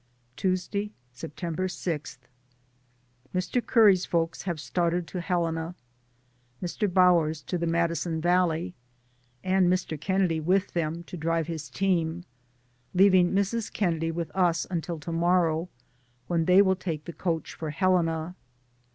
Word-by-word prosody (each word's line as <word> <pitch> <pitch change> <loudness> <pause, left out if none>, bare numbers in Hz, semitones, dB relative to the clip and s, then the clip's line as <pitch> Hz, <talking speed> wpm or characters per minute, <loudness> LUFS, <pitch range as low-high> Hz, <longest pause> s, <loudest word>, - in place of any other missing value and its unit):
Tuesday, 190 +2 -1 0.2
September 165 +7 -4
6. 165 -6 -4 1.2
Mr. 185 +7 0
Curry's 205 -6 +5
folks 165 -1 -1
have 175 -4 -3
started 170 +4 0
to 175 +3 -5
Helena. 170 -2 -1 0.8
Mr. 185 +3 -2
Bower's 170 -5 +3
to - - -4
the 170 -1 -1
Madison 170 0 0
Valley, 175 0 +1 0.7
and 185 -1 +3
Mr. 175 -5 -2
Kennedy 185 -3 +1
with 185 +5 +1
them, 165 0 -2
to 180 - -9
drive 165 0 0
his 160 -3 -6
team, 175 0 0 0.7
leav 195 +1 +6
ing 180 -1 +5
Mrs. 200 +3 0
Kennedy 165 -5 0
with 165 0 -4
us 175 -3 +2
until 170 -1 -3
to 160 +3 -6
morrow, 170 0 +2 0.6
when 165 +3 0
they 185 +3 +6
will 190 -1 +2
take 165 -5 -5
the 170 - -7
coach 165 -3 -2
for 160 - -5
Helena. 165 0 +1
175 Hz, 135 wpm, -27 LUFS, 165-185 Hz, 1.2 s, leav